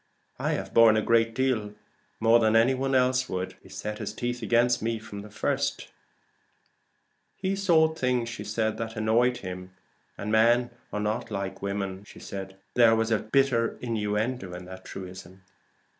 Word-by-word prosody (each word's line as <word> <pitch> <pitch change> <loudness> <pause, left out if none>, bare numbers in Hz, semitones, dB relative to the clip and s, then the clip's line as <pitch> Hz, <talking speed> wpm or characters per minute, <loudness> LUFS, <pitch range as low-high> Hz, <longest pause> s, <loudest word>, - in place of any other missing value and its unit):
I - - 0
have - - -4
borne 115 -1 +7
a - - +2
great 115 -1 +2
deal 115 -6 0 0.4
more 115 +1 +5
than 110 -1 +3
any 115 +4 +5
one 135 +1 -1
else 130 0 +2
would. 90 0 -3
He - - -17
set 105 0 -5
his - - -4
teeth 120 +1 -3
against 120 +2 +2
me 115 +1 -1
from 105 -2 -8
the 105 - -11
first." 105 - -2 1.5
"He 190 +1 -1
saw 170 -5 +4
things 125 -6 -1 0.2
that 110 0 -1
annoyed 115 +3 +2
him; 90 0 -7 0.4
and 105 +1 -4
men 120 +2 +4 0.2
are 105 - -2
not 110 +3 -2
like 100 -2 -4
women," 100 -1 -3
said - - -21
Mrs. - - -12
Transome. 95 -1 -6 0.2
There 115 -2 +6
was 115 0 0 0.2
bitter 130 -4 +2
innuendo 105 -3 -2
in 90 0 -8
that 95 +1 -11
truism. 95 0 -9
115 Hz, 160 wpm, -27 LUFS, 100-120 Hz, 1.5 s, borne